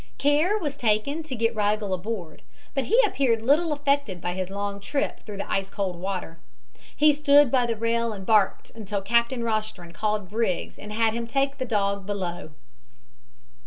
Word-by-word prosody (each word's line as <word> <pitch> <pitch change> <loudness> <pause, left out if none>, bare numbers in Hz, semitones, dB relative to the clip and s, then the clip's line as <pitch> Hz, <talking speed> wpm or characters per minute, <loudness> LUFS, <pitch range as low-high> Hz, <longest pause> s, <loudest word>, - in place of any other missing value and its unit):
Care 300 +9 +3
was 295 -8 -3
taken 230 +7 +1
to 305 -5 -6
get 230 0 +1
Rigel 210 -1 0
aboard, 185 -3 -5 0.3
but 270 -2 -1
he 460 +5 +3
appeared 245 - +1
little 305 +6 +3
affected 280 -9 0
by 175 +1 -3
his 185 0 -3
long 200 0 -4
trip 275 +8 -2
through 210 -2 -9
the 200 - -4
ice 195 0 -1
cold 195 -3 -3
water. 180 -2 -5 0.6
He 300 0 +5
stood 285 -2 +5
by 250 -2 +3
the 230 - -1
rail 230 +1 0
and 195 -3 -7
barked 210 -3 +2
until 205 -3 -4
Captain 235 +3 +1
Rostron 215 -6 -3
called 210 +1 -1
Briggs 220 -5 -1
and 210 - -8
had 220 0 +2
him 230 0 -3
take 275 +2 0
the 260 - -1
dog 200 -4 -1
below. 180 -6 -4
220 Hz, 175 wpm, -25 LUFS, 200-270 Hz, 0.6 s, He